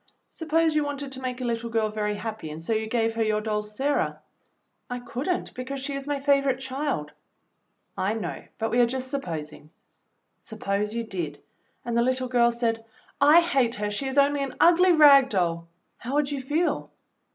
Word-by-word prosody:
Suppose 325 Hz, 0 st, +1 dB
you 305 Hz, -1 st, +2 dB
wanted 285 Hz, -1 st, -5 dB
to 265 Hz, -, -7 dB
make 255 Hz, -1 st, -4 dB
a -, -, -2 dB
little 235 Hz, 0 st, -2 dB
girl 225 Hz, -1 st, 0 dB
very 210 Hz, -1 st, -2 dB
happy 215 Hz, -6 st, -6 dB
and 155 Hz, +1 st, -7 dB
so 165 Hz, +8 st, -2 dB
you 220 Hz, 0 st, -1 dB
gave 225 Hz, 0 st, 0 dB
her 225 Hz, -, -2 dB
your 215 Hz, -1 st, +1 dB
doll, 215 Hz, -1 st, -1 dB
Sarah." 265 Hz, +8 st, -1 dB, 0.7 s
"I 245 Hz, -, -3 dB
could 245 Hz, +5 st, -5 dB
n't, 360 Hz, -, -2 dB
because 260 Hz, +2 st, -5 dB
she 275 Hz, +2 st, -4 dB
is 275 Hz, 0 st, -5 dB
my 290 Hz, -1 st, -1 dB
favorite 275 Hz, -2 st, +2 dB
child." 265 Hz, -, -3 dB, 0.8 s
"I 200 Hz, +4 st, -1 dB
know, 225 Hz, -, -5 dB
but 225 Hz, 0 st, -2 dB
we 240 Hz, -, +2 dB
are 240 Hz, -, +5 dB
just 260 Hz, +1 st, -4 dB
supposing. 160 Hz, -, -5 dB, 0.7 s
Suppose 210 Hz, -1 st, -3 dB
you 235 Hz, -, -1 dB
did, 185 Hz, -7 st, -5 dB, 0.5 s
and 235 Hz, -1 st, -2 dB
the 235 Hz, -, +4 dB
little 255 Hz, +1 st, 0 dB
girl 240 Hz, -1 st, +4 dB
said, 230 Hz, -1 st, -1 dB, 0.4 s
'I 300 Hz, +4 st, +7 dB
hate 270 Hz, -9 st, +1 dB
her, 210 Hz, 0 st, -2 dB
she 270 Hz, +6 st, -2 dB
is 265 Hz, +1 st, -4 dB
only 285 Hz, 0 st, +4 dB
an 275 Hz, -1 st, -4 dB
ugly 355 Hz, +2 st, +6 dB
rag 285 Hz, -5 st, +7 dB
doll,' 170 Hz, -5 st, -1 dB, 0.3 s
how 255 Hz, +4 st, -5 dB
would 295 Hz, -1 st, +1 dB
you 280 Hz, -2 st, -3 dB
feel. 310 Hz, +6 st, -1 dB
245 Hz, 195 wpm, -26 LUFS, 220-280 Hz, 0.8 s, I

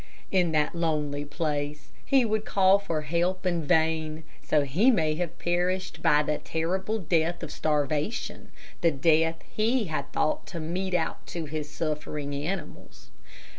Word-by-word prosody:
In 180 Hz, -3 st, +3 dB
that 150 Hz, -1 st, +2 dB
lonely 150 Hz, -4 st, -1 dB
place, 150 Hz, 0 st, -3 dB
he 270 Hz, -3 st, +4 dB
would 215 Hz, -1 st, 0 dB
call 195 Hz, -1 st, +4 dB
for 165 Hz, -6 st, -2 dB
help 175 Hz, +5 st, 0 dB
in 175 Hz, -3 st, +1 dB
vain, 160 Hz, +1 st, +1 dB, 0.2 s
so 150 Hz, -, +2 dB
he 170 Hz, -, +3 dB
may 160 Hz, -11 st, +3 dB
have 175 Hz, -1 st, -3 dB
perished 180 Hz, +1 st, -1 dB
by 150 Hz, 0 st, +4 dB
the 150 Hz, 0 st, -1 dB
terrible 190 Hz, +6 st, -1 dB
death 170 Hz, -2 st, 0 dB
of 155 Hz, -, -5 dB
starvation 150 Hz, -, -1 dB, 0.3 s
the 170 Hz, -, +5 dB
death 160 Hz, +2 st, +3 dB
he 230 Hz, +3 st, +2 dB
had 145 Hz, -2 st, -3 dB
thought 155 Hz, -, 0 dB
to 170 Hz, -, -6 dB
mete 180 Hz, +4 st, -2 dB
out 165 Hz, -2 st, -2 dB
to 170 Hz, -2 st, -4 dB
his 150 Hz, 0 st, -4 dB
suffering 150 Hz, -2 st, -3 dB
animals. 160 Hz, +6 st, -6 dB
160 Hz, 150 wpm, -27 LUFS, 150-180 Hz, 0.3 s, the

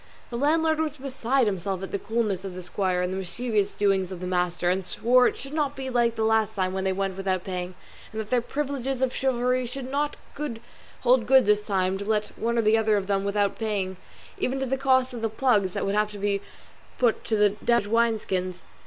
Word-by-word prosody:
The -, -, -4 dB
landlord 315 Hz, +4 st, +2 dB
was 310 Hz, -2 st, -1 dB
beside 265 Hz, -1 st, 0 dB
himself 190 Hz, -1 st, -2 dB
at 195 Hz, -, -6 dB
the 200 Hz, -, -1 dB
coolness 215 Hz, -4 st, -1 dB
of 190 Hz, -2 st, -6 dB
the 185 Hz, -, -6 dB
squire 180 Hz, 0 st, 0 dB
and 180 Hz, +1 st, -1 dB
the -, -, -3 dB
mischievous 205 Hz, +2 st, -1 dB
doings 195 Hz, -2 st, +1 dB
of 185 Hz, -, -6 dB
the 180 Hz, -, -5 dB
master, 180 Hz, -1 st, 0 dB
and 185 Hz, +2 st, +1 dB
swore 245 Hz, +7 st, +3 dB
it -, -, -2 dB
should 275 Hz, +2 st, -8 dB
not 290 Hz, -2 st, 0 dB
be 265 Hz, -1 st, -5 dB
like 235 Hz, -1 st, +2 dB
the 220 Hz, -, -1 dB
last 220 Hz, -1 st, +2 dB
time 185 Hz, -2 st, 0 dB
when 190 Hz, 0 st, -2 dB
they 190 Hz, -, +2 dB
went 195 Hz, 0 st, -2 dB
without 190 Hz, -1 st, -1 dB
paying; 180 Hz, -1 st, -4 dB, 0.4 s
and 220 Hz, -, -5 dB
that 215 Hz, -1 st, -5 dB
their 250 Hz, -1 st, +3 dB
privileges 270 Hz, -1 st, -2 dB
of 255 Hz, -, +1 dB
chivalry 250 Hz, -1 st, +1 dB
should 255 Hz, +1 st, -6 dB
not 290 Hz, +1 st, -1 dB, 0.8 s
hold 245 Hz, -2 st, +3 dB
good 265 Hz, 0 st, +6 dB
this 210 Hz, 0 st, +2 dB
time 190 Hz, -1 st, +1 dB
to 200 Hz, -, -5 dB
let 210 Hz, 0 st, 0 dB
one 235 Hz, +1 st, -1 dB
or 225 Hz, -2 st, +2 dB
other 215 Hz, -1 st, +3 dB
of 195 Hz, -, -2 dB
them 200 Hz, 0 st, +1 dB
off -, -, -5 dB
without 200 Hz, 0 st, 0 dB
paying, 200 Hz, -4 st, -1 dB, 0.4 s
even 265 Hz, +1 st, -1 dB
to 265 Hz, -, -1 dB
the 265 Hz, +1 st, 0 dB
cost 260 Hz, -1 st, +2 dB
of 235 Hz, -, -6 dB
the 225 Hz, -, 0 dB
plugs 215 Hz, -5 st, +2 dB
that -, -, -2 dB
would 195 Hz, -, 0 dB
have 210 Hz, 0 st, +1 dB
to -, -, -7 dB
be 200 Hz, 0 st, 0 dB, 0.6 s
put 240 Hz, -3 st, +2 dB
to 220 Hz, -, +1 dB
the 210 Hz, -1 st, +5 dB
damaged 235 Hz, -3 st, +3 dB
wine 230 Hz, +1 st, +2 dB
skins. 185 Hz, -3 st, -3 dB
215 Hz, 230 wpm, -26 LUFS, 190-250 Hz, 0.8 s, good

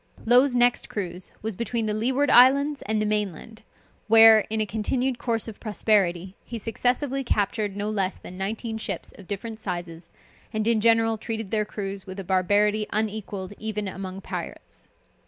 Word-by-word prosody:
Low's 250 Hz, +3 st, +5 dB
next 245 Hz, 0 st, +2 dB
cruise 180 Hz, -3 st, -5 dB
was 220 Hz, -2 st, -3 dB
between 235 Hz, +1 st, -2 dB
the 210 Hz, -, -1 dB
Leeward 255 Hz, +6 st, +1 dB
Islands 280 Hz, +3 st, +5 dB
and 215 Hz, 0 st, +1 dB
the 215 Hz, -, 0 dB
main 210 Hz, -2 st, 0 dB
land, 220 Hz, +7 st, -12 dB, 0.5 s
where, 225 Hz, 0 st, +8 dB
in 220 Hz, 0 st, -1 dB
a 215 Hz, -, +2 dB
continued 245 Hz, +4 st, -1 dB
course 230 Hz, -2 st, -1 dB
of 220 Hz, -, -9 dB
prosperity, 195 Hz, -4 st, 0 dB
he 235 Hz, -, -6 dB
successively 250 Hz, +5 st, -1 dB
captured 205 Hz, -3 st, -1 dB
no 205 Hz, 0 st, -2 dB
less 195 Hz, -3 st, -1 dB
than 180 Hz, -, -11 dB
nineteen 220 Hz, +4 st, -4 dB
ships 195 Hz, -5 st, -4 dB
of 190 Hz, -, -13 dB
different 220 Hz, +2 st, -5 dB
sizes, 175 Hz, -4 st, -6 dB, 0.4 s
and 215 Hz, -1 st, -2 dB
in 230 Hz, -2 st, +3 dB
general 225 Hz, 0 st, +3 dB
treated 225 Hz, -3 st, -5 dB
their 215 Hz, -1 st, +1 dB
crews 195 Hz, -2 st, -6 dB
with 190 Hz, +1 st, -7 dB
a -, -, -4 dB
barbarity 205 Hz, +3 st, +2 dB
unequalled 205 Hz, -3 st, -3 dB
even 210 Hz, -1 st, -3 dB
among 190 Hz, 0 st, -6 dB
pirates. -, -, -8 dB
215 Hz, 170 wpm, -25 LUFS, 195-230 Hz, 0.5 s, where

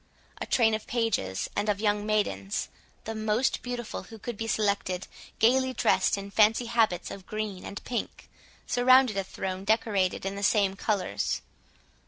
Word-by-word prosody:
A -, -, -3 dB
train 225 Hz, -3 st, +3 dB
of 215 Hz, 0 st, -3 dB
pages 225 Hz, -, -1 dB
and 205 Hz, +1 st, 0 dB
of 200 Hz, -1 st, +1 dB
young 210 Hz, -1 st, 0 dB
maidens, 210 Hz, -1 st, -1 dB, 0.3 s
the 225 Hz, -, -4 dB
most 220 Hz, +3 st, 0 dB
beautiful 245 Hz, -2 st, -5 dB
who 225 Hz, -, -12 dB
could 235 Hz, +2 st, -6 dB
be 225 Hz, +2 st, -4 dB
selected, 200 Hz, -4 st, 0 dB, 0.3 s
gaily 260 Hz, +3 st, +3 dB
dressed -, -, +2 dB
in 200 Hz, 0 st, -7 dB
fancy 220 Hz, +3 st, +4 dB
habits 225 Hz, -7 st, +1 dB
of 190 Hz, -2 st, -9 dB
green 215 Hz, -3 st, -4 dB
and 200 Hz, -, -7 dB
pink, 245 Hz, -, -4 dB, 0.4 s
surrounded 255 Hz, -2 st, +5 dB
a 195 Hz, -, 0 dB
throne 190 Hz, 0 st, -5 dB
decorated 200 Hz, -4 st, +1 dB
in 195 Hz, -, -2 dB
the 200 Hz, -, -5 dB
same 200 Hz, -1 st, +3 dB
colours. 195 Hz, -, -1 dB
215 Hz, 160 wpm, -28 LUFS, 195-225 Hz, 0.4 s, surrounded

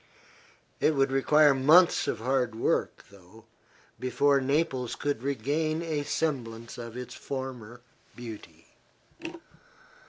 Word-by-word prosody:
It 155 Hz, -, +2 dB
would 135 Hz, -1 st, +2 dB
require 145 Hz, +2 st, +5 dB
months 155 Hz, +7 st, +5 dB
of -, -, -1 dB
hard 125 Hz, 0 st, 0 dB
work, 115 Hz, -, -1 dB
though, 100 Hz, +3 st, -17 dB, 0.5 s
before 140 Hz, +2 st, +2 dB
Naples 135 Hz, -3 st, 0 dB
could 145 Hz, -5 st, -2 dB
regain 145 Hz, +5 st, -1 dB
a 155 Hz, -3 st, -2 dB
semblance 125 Hz, -7 st, -3 dB
of 115 Hz, 0 st, -8 dB
its 125 Hz, -, -7 dB
former 125 Hz, -4 st, -7 dB, 0.3 s
beauty. 115 Hz, -3 st, -10 dB
135 Hz, 105 wpm, -28 LUFS, 115-145 Hz, 0.5 s, require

